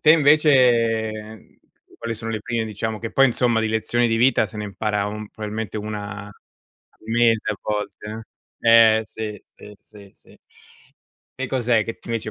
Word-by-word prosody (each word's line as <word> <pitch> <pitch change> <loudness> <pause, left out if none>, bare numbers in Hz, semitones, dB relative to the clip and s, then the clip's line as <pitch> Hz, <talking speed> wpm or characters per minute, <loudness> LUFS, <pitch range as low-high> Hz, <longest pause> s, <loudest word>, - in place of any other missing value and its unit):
Te, 155 - +5
invece, 125 -8 +4
mhmm, 110 0 -11 0.4
quali 115 0 -4
sono 115 +1 -6
le 110 -2 -3
prime, 115 0 -2
diciamo 110 0 -4
che 115 - -5
poi, 135 0 +5
insomma, 120 -1 +1
di 110 - 0
lezioni 120 +2 0
di 115 - +1
vita 120 -1 +3
se 105 - -12
ne 105 - -4
impara 105 0 -2
un 105 0 -6
probabilmente 110 -1 -5
una 105 -1 -6
al 105 - -12 0.7
mese 115 -1 +2
a - - -8
volte, 105 +1 -5 0.3
eh! 115 -1 +6
Eh, - - -1
sì, 105 -2 -7
sì, 105 -1 -13
sì, 100 -1 -16
sì. - - -21 1.0
Che 130 0 -3
cos'è 120 -4 +1
che, 115 0 -6
invece, 115 -2 -3
110 Hz, 170 wpm, -22 LUFS, 105-115 Hz, 1.0 s, eh